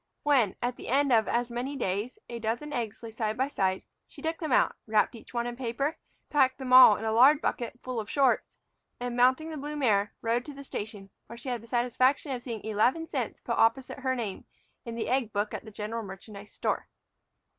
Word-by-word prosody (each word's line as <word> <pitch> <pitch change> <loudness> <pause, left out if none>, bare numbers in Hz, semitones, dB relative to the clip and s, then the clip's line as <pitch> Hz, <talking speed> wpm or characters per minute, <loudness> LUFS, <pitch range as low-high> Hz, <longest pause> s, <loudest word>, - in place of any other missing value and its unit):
When, 260 -10 +3
at 245 0 -1
the - - -9
end 275 +1 +3
of 220 -2 +4
as 240 0 0
many 250 +4 -3
days, 210 - -2
a 235 -1 -6
dozen 235 +7 -3
eggs 230 -2 -4
lay 225 - -6
side 220 0 -2
by 265 +2 +1
side, 190 -8 0 0.2
she - - -15
took 325 0 -3
them 315 -4 -3
out, - - +3
wrapped 215 +2 +2
each 230 - -13
one 235 -1 -1
in 240 0 -4
paper, 265 +5 -2 0.3
packed 265 -3 +3
them 260 -2 -3
all 255 -5 +10
in 220 - -5
a 220 - +1
lard 265 +6 +6
bucket 245 -5 -3
full 255 -2 -3
of 210 - -6
shorts, 270 -3 +1 0.4
and, 245 0 -3
mounting 260 +6 +3
the 310 - -5
blue 295 +2 -5
mare, 210 -8 +1
rode 235 +1 +1
to 290 - -9
the 280 - -9
station, 205 -6 -6 0.2
where 235 - -10
she 245 +3 -6
had 240 -3 -2
the 230 - -14
satisfaction 255 +4 +1
of 250 -2 -3
seeing 230 -4 -6
eleven 240 +10 +1
cents - - -3
put - - -2
opposite 255 +4 +2
her 260 -1 0
name 215 -6 -4 0.4
in 230 -1 -5
the 230 - -3
egg 250 -3 +1
book 205 +1 -1
at - - -5
the - - -8
general 215 +2 -4
merchandise 200 +1 -10
store. - - -2
240 Hz, 220 wpm, -29 LUFS, 220-265 Hz, 0.4 s, all